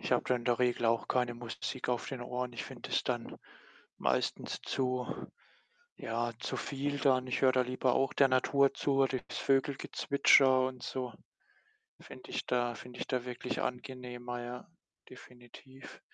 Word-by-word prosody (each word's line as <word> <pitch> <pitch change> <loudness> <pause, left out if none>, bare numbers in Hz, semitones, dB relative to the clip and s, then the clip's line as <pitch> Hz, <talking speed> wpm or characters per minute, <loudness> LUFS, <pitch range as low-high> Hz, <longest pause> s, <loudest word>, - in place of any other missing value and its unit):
Ich - - -4
habe - - +3
da 125 - +2
in 120 - -3
der 120 -1 +2
Regel 125 -1 +1
auch 115 0 +2
keine 125 -2 +1
Musik 120 +2 -5
auf 125 -1 -1
den 135 -3 -5
Ohren. 125 0 -3
Ich 115 - -5
finde - - -9
das - - +1
dann - - -3 0.6
meistens - - 0
zu 125 -1 -1 0.9
ja, 115 +1 -2
zu - - -3
viel 140 +1 -2
dann. 130 -3 +3
Ich 125 - -1
höre 130 - +6
da 130 - +3
lieber 125 0 +1
auch 135 - +1
der 135 - +5
Natur 135 +2 +3
zu, 140 0 0
oder 130 -1 +2
das - - -5
Vogelgezwitscher, 135 -1 +4
und 130 -1 -7
so 125 -2 -4 0.9
finde - - -12
ich - - -2
da 120 -1 +1
finde 125 +1 -10
ich - - -3
da 125 -2 -1
wirklich 125 0 -3
angenehmer, 125 -1 -5
ja, 120 +1 -7 0.4
definitiv. 125 +1 -13
125 Hz, 165 wpm, -32 LUFS, 120-130 Hz, 0.9 s, höre